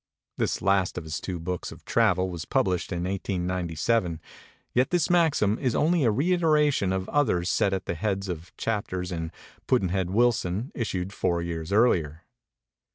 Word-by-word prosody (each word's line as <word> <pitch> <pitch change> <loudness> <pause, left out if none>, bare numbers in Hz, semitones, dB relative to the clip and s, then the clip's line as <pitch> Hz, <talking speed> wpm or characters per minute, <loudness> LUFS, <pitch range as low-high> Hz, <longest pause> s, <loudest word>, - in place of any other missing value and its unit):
This - - -1
last 95 -1 +2
of 90 - -3
his 80 -1 -4
books 90 -1 -4
of - - -13
travel 95 -5 +2
was 85 -3 -5
published 90 -2 0
in 85 0 -2
1897; 90 -1 -1 0.5
yet 125 +1 +2
this 175 -2 +1
maxim 155 - +3
is 130 -4 0
only 165 +1 +2
a - - +5
reiteration 150 - +2
of 95 0 -2
others 100 -12 +1
set 100 - +2
at 95 -1 -2
the - - -2
heads 100 +2 -2
of 85 -1 -6
chap 110 -2 -1
ters 90 0 -4
in 80 -2 -4 0.4
'Pudd'nhead 95 -7 +1
Wilson' 110 0 +1
issued 95 -5 -3
four 85 -3 0
years 85 0 -4
earlier. 85 -8 +2
95 Hz, 160 wpm, -26 LUFS, 90-115 Hz, 0.5 s, a